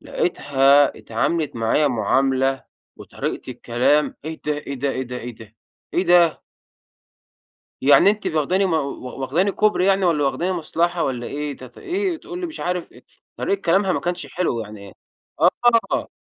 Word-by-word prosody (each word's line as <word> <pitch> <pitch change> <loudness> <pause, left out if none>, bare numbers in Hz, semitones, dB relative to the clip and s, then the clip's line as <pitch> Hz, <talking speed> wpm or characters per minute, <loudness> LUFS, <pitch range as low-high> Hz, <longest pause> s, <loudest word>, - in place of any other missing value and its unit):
لقيتها 140 -3 +2
اتعاملت 145 +5 -2
معايا 115 +6 +2
معاملة 135 +3 +1 0.3
وطريقة - - -5
الكلام 135 +6 +1
إيه 160 0 -6
ده، 150 - +2
إيه 145 -1 -5
ده، 135 +1 -1
إيه 130 - -3
ده، 125 -1 -6
إيه 120 0 -7
ده، 110 -1 -14 0.4
إيه 180 - +2
ده؟! 175 -2 +4 1.4
يعني 145 +8 +6
أنتِ 210 0 -1
واخداني 175 +6 +1
مو 170 - +1
و 140 -3 -5
واخدني 170 +10 +1
كوبري 210 -2 +2
يعني 195 -1 +3
والَّا 155 -4 +2
واخدني 170 +6 0
مصلحة 170 0 -1
والَّا 125 -2 -3
إيه؟ 145 -1 -4
تت 125 -1 -13
إيه، 370 -1 -2
تقول 360 +1 -8
لي 360 - -3
مش 325 -1 -8
عارف 180 -1 -3
إيه، - - -17 0.3
طريقة 200 0 -1
كلامها 190 +3 +2
ما - - 0
كانش 175 0 -3
حلوة 150 -9 -1
يعني. 100 -2 -12 1.0
آه. - - -1
150 Hz, 160 wpm, -21 LUFS, 130-180 Hz, 1.4 s, يعني